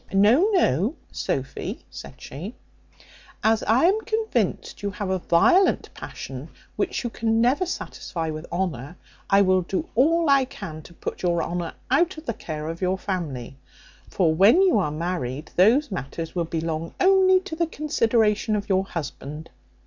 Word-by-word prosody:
No, 220 Hz, -, +5 dB
no, 230 Hz, -, +2 dB, 0.2 s
Sophy," 135 Hz, 0 st, -4 dB
said -, -, -9 dB
she, 180 Hz, -, -8 dB, 0.9 s
"as 220 Hz, 0 st, +3 dB
I 230 Hz, +6 st, +3 dB
am 405 Hz, +5 st, +3 dB
convinced 445 Hz, 0 st, -2 dB
you 205 Hz, -, -1 dB
have 195 Hz, 0 st, -4 dB
a 190 Hz, -, 0 dB
violent 355 Hz, -, +3 dB
passion -, -, -8 dB, 0.3 s
which -, -, -1 dB
you 240 Hz, -, -3 dB
can 225 Hz, 0 st, 0 dB
never 265 Hz, +10 st, +2 dB
satisfy 165 Hz, -, -4 dB
with 155 Hz, +1 st, -7 dB
honour, 175 Hz, -3 st, -3 dB, 0.3 s
I 200 Hz, 0 st, +5 dB
will 185 Hz, -1 st, +3 dB
do 185 Hz, +2 st, -3 dB
all 325 Hz, +7 st, +3 dB
I 275 Hz, -2 st, +5 dB
can 155 Hz, -10 st, -8 dB
to 170 Hz, -, -15 dB
put -, -, -6 dB
your 175 Hz, -2 st, +1 dB
honour 170 Hz, -1 st, -4 dB, 0.2 s
out 345 Hz, +6 st, +2 dB
of 310 Hz, -, -10 dB
the 230 Hz, -, -2 dB
care 155 Hz, -5 st, -6 dB
of 165 Hz, +2 st, -5 dB
your 185 Hz, +1 st, +1 dB
family: 145 Hz, -11 st, -4 dB, 0.5 s
for 170 Hz, -4 st, +2 dB
when 210 Hz, -, +6 dB
you 365 Hz, -, +4 dB
are 180 Hz, -, 0 dB
married 155 Hz, -3 st, -4 dB
those 230 Hz, +9 st, +4 dB
matters 165 Hz, -1 st, -5 dB
will 175 Hz, -2 st, -1 dB
belong 165 Hz, 0 st, -3 dB
only 375 Hz, 0 st, +5 dB
to 375 Hz, -4 st, -7 dB
the 335 Hz, 0 st, 0 dB
consideration 225 Hz, -8 st, +1 dB
of 210 Hz, +1 st, -3 dB
your 190 Hz, 0 st, +2 dB
husband. 150 Hz, -2 st, -7 dB
195 Hz, 165 wpm, -24 LUFS, 165-265 Hz, 0.9 s, when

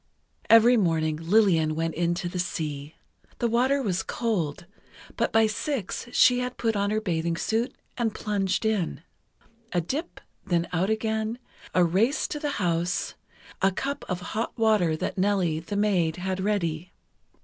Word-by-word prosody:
Every 230 Hz, +2 st, +7 dB
morning 160 Hz, -5 st, +1 dB
Lillian 165 Hz, -3 st, +3 dB
went 165 Hz, 0 st, -1 dB
into 175 Hz, +2 st, -1 dB
the 180 Hz, +1 st, -4 dB
sea. 155 Hz, -5 st, -4 dB, 0.4 s
The 240 Hz, -, +1 dB
water 260 Hz, +4 st, +2 dB
was 190 Hz, -5 st, 0 dB
cold, 175 Hz, -10 st, -2 dB, 0.5 s
but -, -, 0 dB
by 225 Hz, 0 st, +5 dB
six 220 Hz, -, -3 dB
she 245 Hz, 0 st, +5 dB
had 250 Hz, 0 st, -3 dB
put 225 Hz, -2 st, 0 dB
on 200 Hz, 0 st, +1 dB
her 215 Hz, +1 st, +1 dB
bathing 170 Hz, -4 st, -1 dB
suit, 225 Hz, +7 st, -1 dB, 0.2 s
and 230 Hz, -2 st, +1 dB
plunged 200 Hz, -1 st, -1 dB
in. 200 Hz, -7 st, -1 dB, 0.7 s
A 175 Hz, -, +2 dB
dip, 275 Hz, -, -4 dB, 0.2 s
then 175 Hz, -3 st, 0 dB
out 180 Hz, +4 st, +1 dB
again, 220 Hz, +1 st, -1 dB, 0.4 s
a 180 Hz, -, +5 dB
race 200 Hz, -, +2 dB
to 295 Hz, -, -4 dB
the 295 Hz, -1 st, -2 dB
house, 175 Hz, -2 st, 0 dB, 0.5 s
a 195 Hz, -, +4 dB
cup 275 Hz, +9 st, -3 dB
of 180 Hz, -1 st, -2 dB
hot 225 Hz, +2 st, -3 dB
water 210 Hz, -8 st, +3 dB
that 185 Hz, -, -3 dB
Nellie, 185 Hz, -5 st, +1 dB
the 170 Hz, +5 st, -6 dB
maid, 185 Hz, -6 st, +2 dB
had 185 Hz, +1 st, -3 dB
ready. 180 Hz, -4 st, -1 dB
195 Hz, 155 wpm, -26 LUFS, 170-225 Hz, 0.7 s, Every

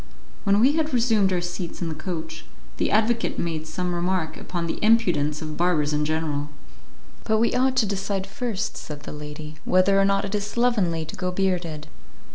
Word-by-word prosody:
When 200 Hz, +1 st, +4 dB
we 255 Hz, +5 st, +6 dB
had 310 Hz, -4 st, 0 dB
resumed 225 Hz, -5 st, +3 dB
our 180 Hz, -1 st, +1 dB
seats 175 Hz, 0 st, -5 dB
in 175 Hz, -, -2 dB
the 160 Hz, -, -3 dB
coach, 160 Hz, -1 st, -5 dB, 0.3 s
the -, -, +1 dB
advocate 225 Hz, +2 st, +2 dB
made 160 Hz, -2 st, -2 dB
some 180 Hz, +1 st, -2 dB
remark 175 Hz, -2 st, -1 dB
upon 175 Hz, -2 st, -4 dB
the 165 Hz, -, -3 dB
impudence 165 Hz, -10 st, +3 dB
of 155 Hz, -1 st, -5 dB
barbers 160 Hz, -4 st, +2 dB
in 150 Hz, 0 st, +1 dB
general. 150 Hz, -2 st, -1 dB, 0.7 s
"But 220 Hz, -1 st, +2 dB
we 230 Hz, +2 st, +2 dB
ought 260 Hz, +1 st, +2 dB
to 230 Hz, -, +4 dB
decide 195 Hz, -1 st, -2 dB
first," 220 Hz, +1 st, -3 dB
said 150 Hz, -1 st, -7 dB
the -, -, -7 dB
lady, 150 Hz, +1 st, -8 dB
"whether 195 Hz, +2 st, +4 dB
or -, -, +4 dB
not 195 Hz, 0 st, +2 dB
it 200 Hz, -, -5 dB
is 205 Hz, -1 st, 0 dB
slovenly 205 Hz, -9 st, +1 dB
to -, -, -7 dB
go 185 Hz, -, -2 dB
bearded." 180 Hz, -5 st, -1 dB
180 Hz, 190 wpm, -24 LUFS, 160-205 Hz, 0.7 s, we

